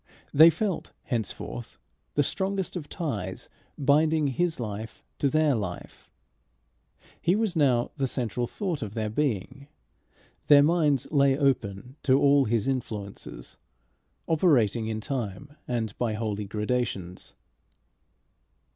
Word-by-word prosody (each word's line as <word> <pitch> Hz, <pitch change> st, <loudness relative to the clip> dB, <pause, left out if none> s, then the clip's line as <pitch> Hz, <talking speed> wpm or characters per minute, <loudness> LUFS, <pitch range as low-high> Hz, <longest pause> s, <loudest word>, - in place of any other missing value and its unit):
They 160 Hz, +4 st, +9 dB
felt 185 Hz, +3 st, -2 dB
henceforth 100 Hz, -, -4 dB, 0.4 s
the 145 Hz, -, +4 dB
strongest 190 Hz, +5 st, -2 dB
of 155 Hz, -5 st, -6 dB
ties 105 Hz, -, -4 dB, 0.3 s
binding 150 Hz, +1 st, +3 dB
his 170 Hz, +4 st, -1 dB
life 110 Hz, -2 st, -6 dB, 0.2 s
to 140 Hz, -, +2 dB
their 155 Hz, 0 st, +3 dB
life. 100 Hz, -7 st, -5 dB, 1.1 s
He 175 Hz, +3 st, +3 dB
was 215 Hz, -4 st, 0 dB
now 130 Hz, -6 st, +2 dB
the 135 Hz, -2 st, 0 dB
central 120 Hz, -1 st, -2 dB
thought 180 Hz, -, -3 dB
of 105 Hz, -1 st, -5 dB
their 110 Hz, -2 st, -2 dB
being. 135 Hz, +1 st, -2 dB, 0.8 s
Their 145 Hz, -1 st, +8 dB
minds 150 Hz, -4 st, +2 dB
lay 140 Hz, -2 st, +4 dB
open 125 Hz, -3 st, -1 dB
to 135 Hz, 0 st, +4 dB
all 140 Hz, -1 st, +5 dB
his 115 Hz, 0 st, 0 dB
influences, 105 Hz, -, -5 dB, 0.7 s
operating 125 Hz, -, +2 dB
in 110 Hz, -1 st, -3 dB
time 130 Hz, +3 st, -5 dB
and 115 Hz, -4 st, -2 dB
by 115 Hz, -3 st, 0 dB
holy 105 Hz, -1 st, -3 dB
gradations. 105 Hz, -4 st, -3 dB
130 Hz, 120 wpm, -27 LUFS, 110-150 Hz, 1.1 s, They